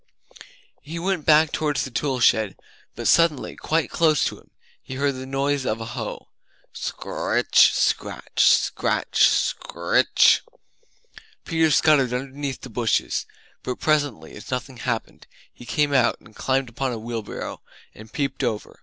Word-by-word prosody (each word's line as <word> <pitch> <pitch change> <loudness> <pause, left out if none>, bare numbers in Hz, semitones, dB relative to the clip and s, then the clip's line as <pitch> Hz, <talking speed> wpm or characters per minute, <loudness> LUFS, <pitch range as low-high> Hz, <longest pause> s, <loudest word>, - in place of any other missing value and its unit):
He 155 +4 -7
went 180 -2 -2
back 155 0 +5
towards 150 -4 -1
the 130 - -8
tool 130 +3 -1
shed, 110 -3 +3 0.4
but - - -3
suddenly, 165 -5 +3
quite 160 +1 -1
close 155 -4 +3
to - - -4
him, - - -24 0.3
he 130 - -8
heard 140 +1 0
the 130 0 -8
noise 135 +1 -1
of 110 -3 -2
a 115 - -5
hoe 115 -4 -6 0.5
scr - - -6
r - - -2
ritch, - - +5
scratch, - - 0
scratch, - - +3
scritch. - - +2 1.0
Peter 165 -1 +2
scuttered 145 -5 +3
underneath 135 +1 -4
the - - -9
bushes, 120 -3 0 0.3
but 125 - -4
presently 145 - 0
as 105 - -11
nothing 130 0 -4
happened, 120 -2 -4 0.3
he 120 - -14
came 145 +1 +1
out 125 -3 +3
and 110 - -19
Climbed 130 -1 -1
upon 130 +2 -3
a 120 - -4
wheelbarrow, 115 -1 -6 0.3
and 110 0 -14
peeped 140 +2 -2
over. 105 -1 -3
135 Hz, 150 wpm, -23 LUFS, 120-150 Hz, 1.0 s, back